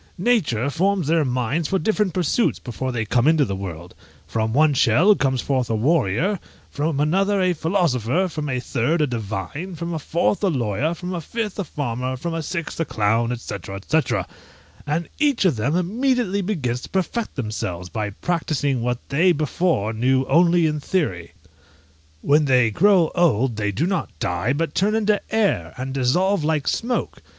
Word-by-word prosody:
Nature 175 - +1
forms 190 +3 +1
their 160 +1 +2
minds 130 +4 -1
for 190 - +1
different 210 -1 0
pursuits 180 +7 +1
before 130 +1 -4
they 115 -3 -2
come 120 +5 +2
into 155 -2 +4
the 100 - -3
world; 90 -2 -7 0.3
from 110 0 -1
one 150 +4 +4
shell 135 - +5
comes 135 - 0
forth 130 -4 -1
a 115 - +1
warrior, 150 - +1 0.3
from 145 0 -1
another 195 +7 +2
a 185 -1 +2
philosopher, 165 - +1
from 155 -4 -4
a 125 -1 -1
third 130 +6 0
a - - +4
divine, 120 - -5
from 170 +1 -4
a 160 - -2
fourth 170 +7 0
a - - +4
lawyer, 135 - -1
from 180 +2 -6
a 175 - -3
fifth 215 +4 -4
a - - 0
farmer, 130 -5 -3
from 170 +6 -4
a 165 - -2
sixth 165 +1 -4
a - - +2
clown, 115 0 0
&c. 115 - -6 0.3
&c., 160 0 +3 0.9
and 155 +3 -1
each 285 -8 +2
of 170 -8 +3
them 125 +9 0
immediately 210 +2 0
begins 140 - -2
to - - -9
perfect 195 +5 -2
themselves, 105 -7 -4
by 105 +2 -3
practising 145 - -1
what 125 +1 0
they 165 +7 +4
before 155 - 0
knew 130 +4 +2
only 170 +4 +4
in 150 -1 0
theory. 140 - -2 0.9
When 150 +1 +4
they 125 -4 +3
grow 185 - +4
old 135 -9 +2
they 105 -1 -1
do 115 - -1
not 190 -1 -1
die, 90 +8 -1
but 155 0 -2
turn 210 +3 +1
into 210 -1 +2
air, 195 - 0
and 130 +1 -4
dissolve 165 +8 +1
like 155 -2 0
smoke! 245 +1 -2
150 Hz, 175 wpm, -22 LUFS, 120-180 Hz, 0.9 s, shell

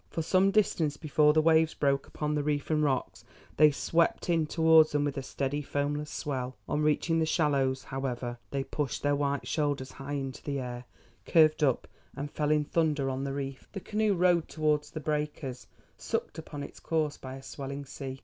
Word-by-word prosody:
For 165 - -3
some 185 +4 +3
distance 170 -8 +1
before 150 -1 +3
the 155 +1 +3
waves 160 0 +4
broke 140 -1 +1
upon 150 0 -3
the 150 - +1
reef 145 0 -1
and 155 -1 +2
rocks 135 -3 -1 0.3
they 155 0 +7
swept 165 +4 +1
in 165 -2 +2
towards 160 -1 +5
them 145 0 +2
with 145 - -2
a 135 - -2
steady 135 +2 -2
foamless 145 +1 -2
swell. 130 -3 -4
On 150 - 0
reaching 155 +2 +2
the 160 - +2
shallows, 140 -5 +1
however, 125 -2 -4
they 140 -1 -2
pushed 140 -2 -3
their 145 0 +2
white 140 0 -1
shoulders 145 -4 -1
high 135 +1 -7
into 135 -2 -4
the 140 -1 -3
air, 125 -1 -6 0.4
curved 155 -1 +5
up 135 -4 +2 0.3
and 145 +1 -5
fell 150 -1 -1
in 150 0 +3
thunder 150 -4 +1
on 130 +1 -3
the 135 - -3
reef. 135 -1 -5
The 195 - -4
canoe 210 +1 0
rode 175 -2 +3
towards 150 -2 0
the 155 - -6
breakers, 150 -5 -3 0.3
sucked - - -3
upon 145 -2 -7
its - - -10
course 155 -2 -1
by 130 0 -7
a 135 - -10
swelling 140 +1 -6
sea. 135 -1 -7
145 Hz, 195 wpm, -29 LUFS, 135-155 Hz, 0.4 s, they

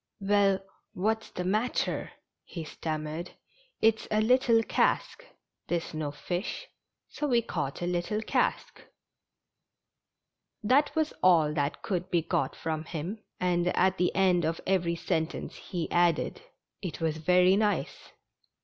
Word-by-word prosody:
"Well, 200 -1 +3 0.3
what's 220 +4 -1
the 180 - -4
matter? 215 +7 -1 0.2
" - - -59
he 170 - -7
stammered. 155 +1 -5 0.2
" - - -34
It's 220 0 +3
a 215 - +2
little 230 0 +4
cask - - 0 0.2
— - - -56
there's 170 -1 -2
no 155 -2 -2
fish, 180 - -4 0.4
so 295 - -3
we 240 -3 +3
caught 140 -6 -3
a - - 0
little 180 +4 -1
cask." - - -1 1.8
That 275 +9 +3
was 315 -1 +1
all 160 -5 +5
that 145 -1 -2
could 180 -2 -2
be 170 -3 +1
got - - -1
from 160 -1 -3
him, 175 +8 -5 0.2
and 175 -1 +1
at 190 +1 +3
the 180 - +3
end 185 -2 +3
of 160 +1 -1
every 180 -3 +1
sentence 165 -1 -2
he 175 -4 -4
added: 175 -2 +2 0.4
"It 180 -6 -5
was 160 -2 -1
very 180 +3 +4
nice! 210 0 -1
180 Hz, 140 wpm, -29 LUFS, 165-215 Hz, 1.8 s, all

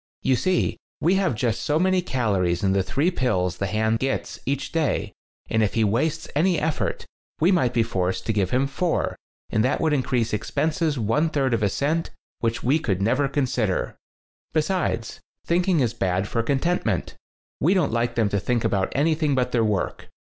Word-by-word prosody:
You 130 - +3
see, 185 +7 0 0.2
we 175 - +3
have 170 - +1
just 115 0 -1
so 145 +6 +1
many 185 +2 +2
calories 100 - 0
in 95 - +3
the 100 - +2
three 145 - 0
pills 90 - 0
the 100 - 0
hand 110 +2 +1
gets 135 0 -2
each 140 0 -2
day, 140 - 0 0.3
and 110 - +1
if 105 - 0
he 115 - +3
wastes 150 +10 0
any 175 +3 +3
effort 155 0 -2 0.3
we 170 +5 +4
might 160 -10 +2
be 120 -2 +2
forced 95 -5 -2
to 110 - 0
give 100 -3 +1
him 130 +5 +2
four, 160 +5 -1 0.4
and 110 - +2
that 130 - +1
would 160 -2 +1
increase 125 -5 0
expenses 155 - 0
one 125 +9 +1
third 135 -5 0
of 115 - +1
a 100 - +2
cent, 155 - -1 0.3
which 115 -1 -1
we 140 +6 +3
could 100 - -1
never 125 +8 +2
consider. 125 -8 -1 0.6
"Besides, 155 -8 -1 0.3
thinking 175 -1 +2
is 120 -3 +1
bad 95 -3 0
for 115 - 0
con 135 +4 +1
tentment. 130 - -1 0.5
We 175 +8 +3
don't 165 -10 +1
like 120 0 0
them 115 -3 +2
to 100 - 0
think 120 +3 0
about 95 -1 0
anything 155 0 +2
but 125 -1 0
their 115 -2 +2
work. 105 -4 -2
125 Hz, 190 wpm, -24 LUFS, 110-155 Hz, 0.6 s, we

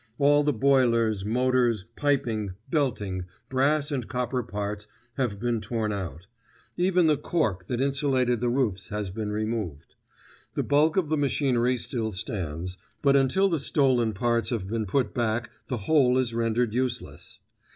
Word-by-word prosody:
All 145 +1 +5
the 150 - +2
boilers, 115 -5 +2
motors, 120 -2 +1
piping, 115 -9 0 0.2
belting, 105 - -1 0.2
brass 145 +3 +2
and 130 -5 -2
copper 125 0 -1
parts 105 -2 -4 0.3
have 120 -7 -2
been 120 -1 -1
torn 110 0 -2
out. 90 -3 -5 0.5
Even 180 -1 +3
the 155 -2 +4
cork 110 - -1
that 120 - -2
insulated 135 -3 +1
the 120 - +1
roofs 120 -8 0
has 105 -2 -4
been 105 +1 -4
removed. 105 -8 -3 0.6
The - - 0
bulk 150 +4 +3
of 175 -6 +1
the 155 - +1
machinery 130 -3 +1
still 115 -2 -3
stands, 90 -3 -4 0.2
but 140 -1 +5
until 140 +9 +3
the 165 -5 0
stolen 130 -6 +2
parts 120 +1 0
have 110 -6 -2
been 110 0 -2
put 125 +7 0
back 120 0 -1 0.2
the 125 - -2
whole 130 -5 +4
is 125 -3 0
rendered 115 0 0
useless. 125 - -3
120 Hz, 150 wpm, -26 LUFS, 105-135 Hz, 0.6 s, All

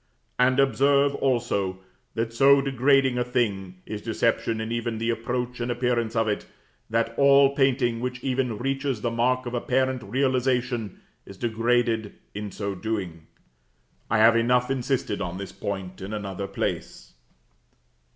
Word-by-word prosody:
And 130 +1 +4
observe, 140 +1 +3
also, 120 -9 0 0.4
that 115 0 -2
so 140 +3 +6
degrading 135 -1 +2
a - - +2
thing 105 -7 -1
is 105 -1 -6
deception 115 0 0
in 110 +1 -4
even 115 -1 -2
the 115 +1 0
approach 120 +2 -3
and 120 +1 -2
appearance 120 -1 0
of 115 -1 +2
it, 105 - -2 0.4
that 115 +1 0
all 140 0 +6
painting 130 -4 +2
which 125 0 -4
even 125 -4 -1
reaches 135 -1 -2
the 120 - -1
mark 125 +2 +1
of 120 - -5
apparent 130 +1 0
realization, 125 -4 -1 0.3
is 100 - -11
degraded 115 -1 0 0.2
in 105 0 -5
so 100 +1 -4
doing. 95 -6 -4 0.8
I 115 - +2
have 115 +2 +6
enough 125 +2 +2
insisted 130 -5 -1
on 90 -1 -4
this 100 0 -6
point 95 -2 -5
in 95 +3 -6
another 100 -2 -4
place. - - -4
120 Hz, 145 wpm, -25 LUFS, 110-130 Hz, 0.8 s, so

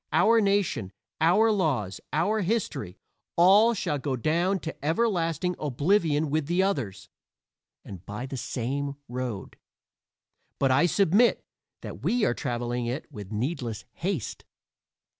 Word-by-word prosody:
Our 230 0 +5
nation, 195 - 0 0.3
our 210 +8 +4
laws, 135 - 0
our 210 +8 +1
history 175 - -2 0.4
all 205 +7 +6
shall 150 -7 -1
go 135 -1 -2
down 170 - +1
to 160 - -5
everlasting 170 -1 0
oblivion 150 +1 +1
with 155 -1 0
the 175 +3 +2
others, 135 - -2 0.8
and 95 -3 -9
by 105 +5 -6
the 135 - -6
same 140 +3 -3
road. 120 -5 -5 1.0
But 135 -1 +2
I 140 +7 +4
submit 200 +6 +3 0.4
that - - -8
we 240 -2 +1
are - - +2
traveling 120 -1 -3
it 130 +6 -4
with 105 -6 -9
needless 120 -1 -3
haste. 175 - -3
155 Hz, 125 wpm, -27 LUFS, 125-190 Hz, 1.0 s, all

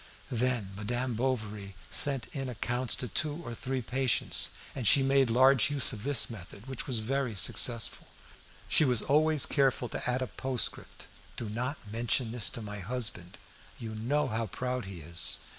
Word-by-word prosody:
Then 120 -4 -1
Madame 120 +5 -3
Bovary 110 -5 -3 0.2
sent 140 -3 +3
in 135 -2 -4
accounts 120 +2 0
to 125 - -3
two 150 +6 -2
or 120 - -6
three 130 +2 -4
patients, 130 +1 0 0.2
and 125 -5 -3
she 135 +5 +5
made 135 -1 +3
large 130 +2 +5
use 140 -3 +2
of 105 - -8
this 145 -1 +2
method, 100 -1 -11
which 130 -2 -5
was 130 -4 +1
very 125 +1 -2
successful. 115 +4 +2 0.6
She - - +4
was 125 -6 +1
always 155 0 +4
careful 135 -4 +1
to - - -4
add 125 +1 0
a - - -2
postscript: 130 0 -3 0.3
"Do 115 - -5
not 125 +7 -3
mention 115 +1 +2
this 115 -2 +1
to 115 - -6
my 105 -1 -7
husband; 100 -4 -3 0.4
you 110 -2 -7
know 135 +7 -1
how 115 -1 -2
proud 125 +3 -4
he 95 -3 -9
is. 80 +2 +5
125 Hz, 170 wpm, -29 LUFS, 110-135 Hz, 0.6 s, she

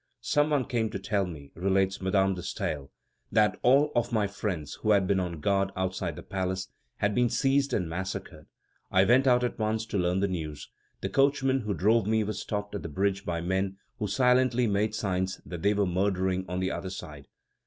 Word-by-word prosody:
"Some 150 +1 +2
one 145 -4 +1
came 115 -3 0
to - - -4
tell 100 0 -1
me," 75 -5 -9
relates 95 +1 +1
Madame 95 +1 +2
de 90 - -5
Staël, 70 -4 -3 0.4
"that 105 -1 +3
all 140 +4 +4
of 120 - +1
my 110 -3 +2
friends 100 -6 -4
who 110 - -1
had 100 -2 +4
been 95 0 +2
on 85 -3 -3
guard 100 +3 +1
outside 95 0 -2
the - - -9
palace, 95 0 -3 0.3
had 105 0 0
been 125 +1 +3
seized 135 +2 +2
and 95 -8 0
massacred. 95 +4 -5 0.4
I 95 - +4
went 130 +5 +4
out 125 -1 +4
at 120 - -2
once 110 +1 0
to 105 -3 -2
learn 90 +1 +1
the 100 - +2
news; 80 -5 -5 0.3
the 95 - -2
coachman 135 +2 +2
who 105 -4 -2
drove 105 +3 +3
me 110 0 +2
was 105 0 -3
stopped 105 -1 -4
at 100 - -3
the 85 - -6
bridge 95 +4 -1
by 85 -1 -1
men 95 +2 -1 0.2
who 105 - -1
silently 125 +3 +3
made 105 0 +1
signs 95 -3 -1
that 85 -2 -6
they 100 +1 +3
were 100 0 +2
murdering 95 0 0
on 90 +1 -2
the 95 - 0
other 95 +2 -4
side. 75 -6 -8
100 Hz, 205 wpm, -28 LUFS, 95-110 Hz, 0.4 s, all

